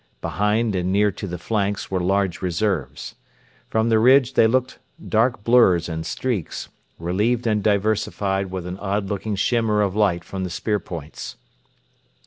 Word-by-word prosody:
Behind 105 +2 0
and 90 0 -1
near 105 +1 +3
to 100 +1 -7
the 90 -1 -5
flanks 100 +1 -2
were 95 - 0
large 95 0 0
reserves. 90 -3 -2 0.6
From 110 +1 +1
the 110 -1 +4
ridge 130 +2 +5
they 115 - +5
looked 130 +2 0 0.3
dark 115 -1 +1
blurs 110 -8 +4
and 80 -1 -4
streaks, 120 -11 -3 0.3
relieved 105 +8 0
and 105 -2 +1
diversified 100 -2 0
with 90 -2 -5
an 90 +2 -6
odd 100 0 -2
looking 105 +1 -2
shimmer 110 0 +1
of 100 -1 -1
light 95 -5 +2
from 95 +2 -5
the 90 - -3
spear 105 +5 -1
points. 80 -6 -8
100 Hz, 155 wpm, -22 LUFS, 95-110 Hz, 0.6 s, ridge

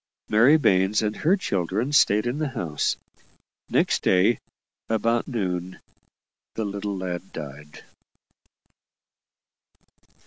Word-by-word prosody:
Mary 120 +9 +6
Baines 95 -5 +2
and 105 0 -1
her 180 +6 +2
children 100 - -1
stayed 105 -7 +4
in 125 +5 -2
the 155 - 0
house. 85 - -2 0.7
Next - - +1
day, 95 +5 +3 0.5
about 115 +1 +1
noon, 95 -7 -3 0.8
the 110 - -2
little 100 0 -4
lad 90 0 -5
died. 75 -1 -9
100 Hz, 100 wpm, -24 LUFS, 90-120 Hz, 0.8 s, Mary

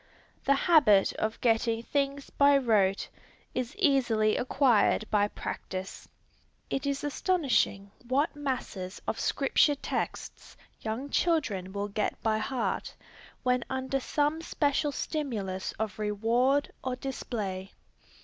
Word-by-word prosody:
The 275 - +4
habit 275 - +5
of 215 +1 -2
getting 230 -1 +2
things 280 +1 -2
by 280 0 +5
rote, 210 -7 +2 0.5
is 250 -1 -3
easily 245 - +3
acquired 245 -4 +3
by 205 -1 +3
practice. 190 -2 -6 0.6
It 270 +1 -1
is 280 0 -1
astonishing 280 - +1 0.2
what 285 +6 +1
masses 245 -9 -4
of 225 - -2
Scripture 290 +1 +3
texts 280 - -5 0.2
young 235 +6 -4
children 230 - +1
will 200 +1 -3
get 205 +1 -2
by 215 -1 +2
heart, 250 +3 -2 0.5
when 250 -1 +2
under 265 +1 -1
some 295 +4 0
special 295 -2 0
stimulus 215 - -3
of 215 -1 -4
reward 230 +7 +1
or 255 -1 -1
display. 210 -8 -4
250 Hz, 115 wpm, -29 LUFS, 210-280 Hz, 0.6 s, habit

